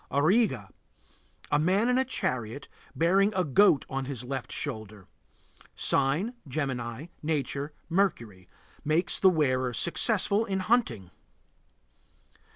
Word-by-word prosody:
AURIGA. 145 - +1 0.8
A 145 - +3
man 190 +8 +2
in 250 +1 +2
a - - +3
chariot, 125 - -3 0.3
bearing 195 +5 +3
a 185 - +2
goat 155 0 +4
on 135 0 -4
his 130 -3 -6
left 130 0 -5
shoulder. 110 -7 -6 0.7
Sign: 155 - +1
Gemini. 130 -2 -4 0.2
Nature: 145 -1 -2 0.2
Mercury. 120 - -1 0.3
Makes 160 +4 +1
the 190 - +6
wearer 130 -7 0
successful 200 - +2
in 190 -3 -2
hunting. 160 - 0
145 Hz, 110 wpm, -28 LUFS, 125-190 Hz, 0.8 s, the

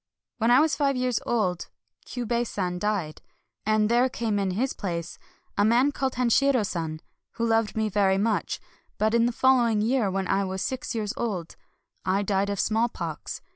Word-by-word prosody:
When 225 +1 +2
I 250 +3 +7
was 310 -2 +2
five 280 -2 +1
years 250 -2 0
old, 185 -7 0 0.4
Kyiibei 240 -1 -1
San 180 -4 -3
died; 195 -7 -2 0.5
and 215 -1 +3
there 240 +3 +3
came 225 -4 -1
in 195 -1 0
his 235 +9 -1
place 170 -3 -5 0.4
a - - +5
man 240 +6 +4
called 265 -2 -2
Hanshiro 250 0 +3
San, 160 -4 -4 0.3
who 230 - -1
loved 225 -1 +1
me 220 0 +1
very 195 -2 +2
much. 215 +2 0 0.4
But 215 +1 +1
in 235 0 +4
the - - 0
following 240 -3 +3
year, 225 -1 +1
when 190 0 -2
I 195 +1 +1
was 190 0 -3
six 260 -2 -3
years 210 -2 -2
old, 190 -8 -3 0.5
I 195 +2 +1
died 200 0 0
of 200 -1 -2
smallpox. 215 -8 -2
215 Hz, 175 wpm, -26 LUFS, 195-240 Hz, 0.5 s, I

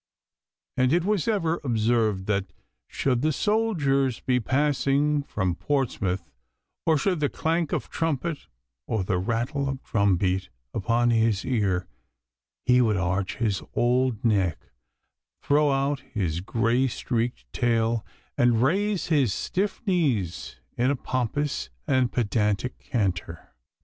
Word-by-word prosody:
And 130 0 +3
it 170 +1 +3
was 205 -6 +1
ever 175 -7 0
observed 110 -5 +1
that, 100 -2 -1 0.4
should 125 -3 0
the 155 +2 +2
soldiers 150 - +1
be 125 -1 +1
passing 145 +3 +1
from 95 -10 -2
Portsmouth, 95 - -1 0.6
or 160 -1 +5
should 180 +2 0
the 145 -2 +1
clank 165 0 -1
of - - -2
trumpet 165 -1 -2 0.4
or 110 -4 0
the 90 -1 0
rattle 120 - -1
of 135 0 -5
drum 100 -4 +2
break 95 0 0 0.2
upon 120 +2 +1
his 110 -3 +2
ear, 100 -8 0 0.8
he 125 0 +5
would 110 -4 +2
arch 95 +1 -1
his 105 -4 0
old 125 -1 +1
neck, 95 -7 0 0.7
throw 145 +1 +3
out 135 +1 0
his 95 - -3
grey 115 +6 +1
streaked 120 0 -2
tail, 115 -2 +1 0.3
and 120 -1 +3
raise 195 +6 +1
his 140 - +3
stiff 200 +4 -2
knees 105 - 0 0.2
in 125 +2 +2
a 140 - +2
pompous 130 +3 -2 0.2
and 130 -4 +2
pedantic 105 +1 0
canter. 90 -7 -3
125 Hz, 130 wpm, -26 LUFS, 105-145 Hz, 0.8 s, or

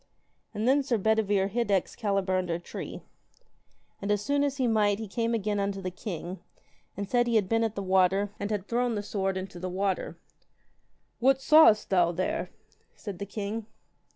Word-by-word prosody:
And 220 +1 -2
then 275 +2 +4
Sir 260 -4 0
Bedivere 205 -2 +2
hid 235 +2 -1
Excalibur 195 -1 0
under 180 -2 0
a - - -4
tree. 175 - -8 1.0
And 200 +1 -1
as 205 - +2
soon 280 +7 +1
as 280 -1 -1
he 260 - +1
might 210 -3 +2
he 220 0 -6
came 230 +3 -1
again 210 -1 -1
unto 200 0 -1
the 185 -1 -4
king, 180 -1 -6 0.6
and 200 0 -3
said 240 +1 +2
he 235 - +1
had 205 -4 +3
been 225 +3 +2
at 220 -2 -1
the 200 - -3
water, 190 +2 +2
and 205 - -3
had 205 -2 -3
thrown 240 0 0
the 205 - -3
sword 195 -2 -2
into 185 -1 -6
the 185 +1 -4
water. 190 +1 -2 1.0
What 265 +2 +4
sawest 285 -9 +6
thou 175 -3 +4
there? 315 - -2 0.5
said 200 -5 -7
the 200 - -5
king. 210 +2 -4
205 Hz, 185 wpm, -28 LUFS, 190-230 Hz, 1.0 s, sawest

